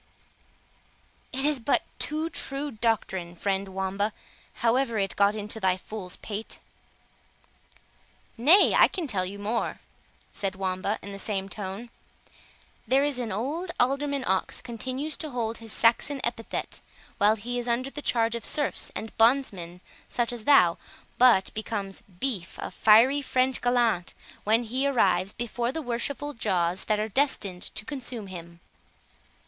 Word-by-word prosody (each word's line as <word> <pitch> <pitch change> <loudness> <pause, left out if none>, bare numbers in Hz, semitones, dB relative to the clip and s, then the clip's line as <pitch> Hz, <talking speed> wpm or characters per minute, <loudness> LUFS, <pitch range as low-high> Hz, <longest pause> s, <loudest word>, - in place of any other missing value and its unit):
"It 270 +2 -1
is 295 -2 +2
but 240 +4 +2 0.2
too 315 +2 -1
true 280 0 -2
doctrine, 210 -6 -1
friend 195 +2 -1
Wamba, 190 +2 -2 0.5
however 235 0 +2
it 195 -2 -1
got 200 +1 +3
into 210 +1 -4
thy 185 -2 +2
fool's 190 -1 -5
pate." 215 +1 -6 1.8
"Nay, 310 - +6
I - - +7
can 360 -4 -4
tell 190 -9 0
you 200 +2 -7
more," 215 +3 -2 0.5
said 195 -2 -2
Wamba, 190 +2 -1
in 200 - -7
the 200 - -7
same 195 -1 -2
tone; 205 +4 -5 1.0
"there 270 +2 +4
is 285 -3 0
old 250 - -3
Alderman 275 +1 +1
Ox 190 0 0
continues 260 +6 -4
to 310 - -3
hold 230 -3 -3
his 225 -1 -9
Saxon 235 +6 +2
epithet, 235 -1 -3 0.4
while 210 +2 +5
he 245 +3 -3
is 240 - -2
under 250 +3 0
the 295 - -6
charge 230 -4 +1
of 235 - -4
serfs 290 -2 0
and 220 - -6
bondsmen 205 -8 +2 0.3
such 240 0 0
as 230 -3 -7
thou, 180 -13 +6 0.4
but 240 -7 +5
becomes 205 -3 -4 0.2
Beef, 225 -11 -2
a - - -5
fiery 235 +7 +5
French 260 -1 +1
gallant, 235 -7 +1 0.3
when 225 +3 +3
he 255 +5 0
arrives 195 -8 +2
before 240 +1 -2
the 320 +2 -4
worshipful 280 +4 -2
jaws 185 -6 0
that 215 -1 +1
are 215 - 0
destined 205 -6 0
to 215 - -1
consume 245 -5 -5
him. 170 -2 -10
225 Hz, 145 wpm, -27 LUFS, 195-260 Hz, 1.8 s, I